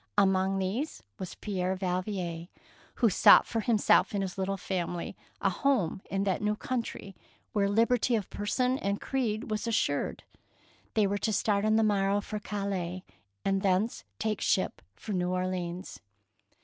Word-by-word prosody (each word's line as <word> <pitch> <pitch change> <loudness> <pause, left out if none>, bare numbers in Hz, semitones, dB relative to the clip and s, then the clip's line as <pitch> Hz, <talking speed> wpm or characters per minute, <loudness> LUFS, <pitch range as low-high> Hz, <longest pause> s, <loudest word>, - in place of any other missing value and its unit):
Among 190 -1 +3
these 205 +11 -2 0.2
was 185 - -6
Pierre 190 -2 -2
Valvier, 180 -2 -3 0.5
who 230 - +4
sought - - +7
for 230 - -2
himself 215 -1 +3
and 195 - 0
his 185 -2 -4
little 195 0 -1
family 175 -2 -3 0.3
a - - +2
home 245 - +1
in 195 0 0
that 195 -2 0
new 210 0 +1
country 225 -4 -4 0.4
where 200 -2 +2
liberty 230 +3 +3
of 210 -4 -1
person 250 +5 0
and 200 +1 -1
creed 225 -5 -2
was 215 +2 -2
as 230 - +1
sured. 145 -8 0 0.7
They 215 -2 +4
were 200 +1 0
to 220 - 0
start 205 0 +1
on 215 0 +3
the 225 - +4
morrow 200 -1 +2
for 210 +1 -5
Calais, 195 -3 -3 0.4
and 195 0 +2
thence 195 +3 +1
take 215 -1 -1
ship - - +1
for 215 - -6
New 180 -1 0
Orleans. 180 -1 -3
200 Hz, 160 wpm, -29 LUFS, 185-215 Hz, 0.7 s, sought